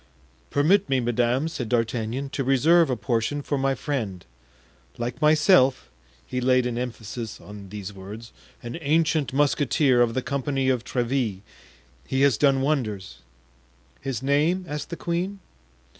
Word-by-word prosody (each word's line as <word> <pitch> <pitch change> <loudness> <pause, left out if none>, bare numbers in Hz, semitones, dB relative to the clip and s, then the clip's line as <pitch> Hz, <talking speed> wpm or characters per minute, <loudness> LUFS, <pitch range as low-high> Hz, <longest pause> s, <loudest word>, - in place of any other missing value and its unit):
"Permit 185 +7 +3
me, 135 -1 +2
madame," 120 +4 +1
said 125 -8 -5
D'Artagnan, 120 +3 -1
"to 140 - -2
reserve 155 +5 +4
a 130 - +1
portion 120 +6 -1
for 145 - -1
my 135 0 +1
friend; 115 - -4 0.7
like 120 +3 -4
myself" 150 - +4 0.3
(he 125 - -3
laid 130 0 +3
an 125 -1 -2
emphasis 120 -2 -5
on 100 -1 -11
these 105 0 -7
words) 105 +4 -10 0.3
"an 120 +7 -6
ancient 155 -2 +1
musketeer 140 -1 +2
of 115 -1 +2
the 130 - -1
company 140 -2 -1
of 125 -3 +1
Tréville; 120 -6 -1 0.6
he 130 - -1
has 140 -6 +4
done 135 -2 +3
wonders." 110 -10 -2 0.8
"His 130 -3 -4
name?" 155 +7 +2
asked 150 -1 -5
the 170 - -4
queen. 180 +4 -2
130 Hz, 145 wpm, -25 LUFS, 115-145 Hz, 0.8 s, reserve